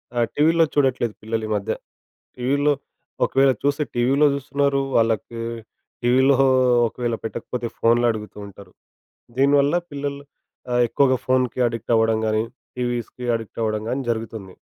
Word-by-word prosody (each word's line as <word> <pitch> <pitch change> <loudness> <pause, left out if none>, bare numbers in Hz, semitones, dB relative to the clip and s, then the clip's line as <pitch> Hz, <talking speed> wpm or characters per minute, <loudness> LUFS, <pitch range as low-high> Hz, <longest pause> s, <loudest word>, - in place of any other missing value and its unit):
ఆహ్, 120 -1 +2
టీవీలో 165 +2 +4
చూడట్లేదు 130 -5 +1
పిల్లలు 110 +1 -3
ఈ - - -8
మధ్య. 100 -1 -2 0.6
టీవీలో 140 +4 +1 0.5
ఒకవేళ 135 0 +3
చూస్తే 145 +1 +1
టీవీలో 135 +5 +3
చూస్తున్నారు. 140 0 0
వాళ్ళకి 115 0 +1 0.6
టీవీలో 130 +3 +4 0.5
ఒకవేళ 120 0 -3
పెట్టకపోతే 120 +1 -4
ఫోన్‌లో 120 +1 +3
అడుగుతూ 105 -1 -8
ఉంటారు. 100 0 -14 0.7
దీనివల్ల 140 +3 +3 0.2
పిల్లలు 140 0 -4 0.5
ఆ - - +1
ఎక్కువగా 130 +2 +2
ఫోన్‌కీ 130 -1 +1
అడిక్ట్ 115 0 -3
అవ్వడం 110 0 +2
గానీ, 110 0 +1 0.3
టీవీస్‌కీ 120 0 -3
అడిక్ట్ 115 -1 -6
అవ్వడం 110 -1 -1
గానీ 130 +3 -1
జరుగుతుంది. 110 -4 -4
125 Hz, 125 wpm, -22 LUFS, 115-140 Hz, 0.7 s, టీవీలో